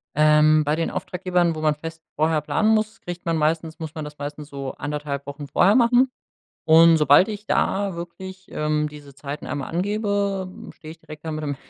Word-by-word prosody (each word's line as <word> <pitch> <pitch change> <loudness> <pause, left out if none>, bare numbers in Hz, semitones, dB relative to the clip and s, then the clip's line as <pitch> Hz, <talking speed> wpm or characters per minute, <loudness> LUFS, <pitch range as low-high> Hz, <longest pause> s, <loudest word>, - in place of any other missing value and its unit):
Ähm, 155 +1 +5
bei 150 +1 0
den 165 +1 -2
Auftraggebern, 180 -2 -1
wo 155 - -5
man 155 -1 +3
fest 160 +1 -9
vorher 155 0 +1
planen 215 +8 +1
muss, 220 0 +1
kriegt 175 0 -7
man 165 -1 0
meistens 160 +1 -1
muss 160 -1 -7
man 155 -2 -5
das 150 0 -10
meistens 145 +1 -6
so 140 -2 -6
anderthalb 145 -1 -4
Wochen 145 +1 -7
vorher 180 +8 +4
machen. 250 +1 +4 0.5
Und 165 +1 +7
sobald 150 +5 +5
ich 210 0 -6
da 195 -1 0
wirklich, 185 +2 -9
ähm, 150 0 -1
diese 145 -2 -13
Zeiten 145 +2 -7
1 140 0 -4
angebe, 200 +1 -1 0.3
steh 155 - -12
ich 165 - -11
direkt 155 -1 -12
da 160 - -3
mit 155 0 -4
dem 145 -2 -3
160 Hz, 195 wpm, -23 LUFS, 150-185 Hz, 0.5 s, Und